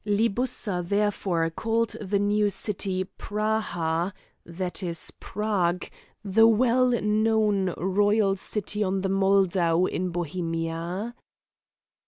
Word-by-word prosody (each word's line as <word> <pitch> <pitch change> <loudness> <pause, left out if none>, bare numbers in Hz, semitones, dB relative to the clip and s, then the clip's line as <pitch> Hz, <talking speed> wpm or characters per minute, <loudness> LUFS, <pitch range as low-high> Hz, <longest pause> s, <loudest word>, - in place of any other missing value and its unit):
Libussa 210 -2 0
therefore 190 -3 0
called 225 +5 0
the 200 0 0
new 205 +1 +2
city 190 -2 -1 0.2
Praha, 200 -5 -1 0.3
that 180 +3 -4
is 170 -3 -3
Prague, 190 -4 -1 0.4
the 225 +3 +5
well 250 +3 +3
known 210 -2 +2
royal 205 +2 +2
city 210 +2 -2
on 190 0 -1
the 195 - -1
Moldau 190 -3 +3
in 185 0 -2
Bohemia. 170 +4 -3
195 Hz, 100 wpm, -26 LUFS, 180-210 Hz, 0.4 s, the